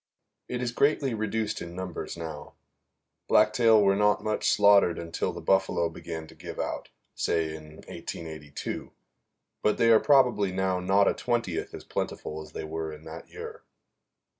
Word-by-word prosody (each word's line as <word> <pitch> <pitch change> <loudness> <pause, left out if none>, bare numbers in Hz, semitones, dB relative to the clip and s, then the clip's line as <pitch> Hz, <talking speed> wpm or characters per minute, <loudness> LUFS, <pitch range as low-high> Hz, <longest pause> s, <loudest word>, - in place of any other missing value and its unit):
It 125 0 -3
is 120 - -1
greatly 140 0 +2
reduced 110 0 -2
in 85 0 -7
numbers 90 -2 -5
now. 80 -3 -7 0.7
Blacktail 110 0 +5
were 100 0 +4
not 105 0 +2
much 110 0 0
slaughtered 100 -4 +5
until 85 -1 -2
the - - -8
buffalo 95 -3 +2
began 80 -1 -7
to - - -15
give - - -9
out, - - -3 0.2
say 80 -2 0
in 75 0 -11
1882; 80 -3 -6 0.7
but 105 - +2
they 115 0 +5
are 110 - +7
probably 125 -9 +4
now 95 0 0
not 95 +2 +3
a - - +4
twentieth 115 -8 -2
as - - -9
plentiful 80 +1 -4
as 80 - -12
they - - -5
were 80 0 -4
in 75 0 -11
that 80 +1 -9
year. - - -8
95 Hz, 160 wpm, -28 LUFS, 80-110 Hz, 0.7 s, are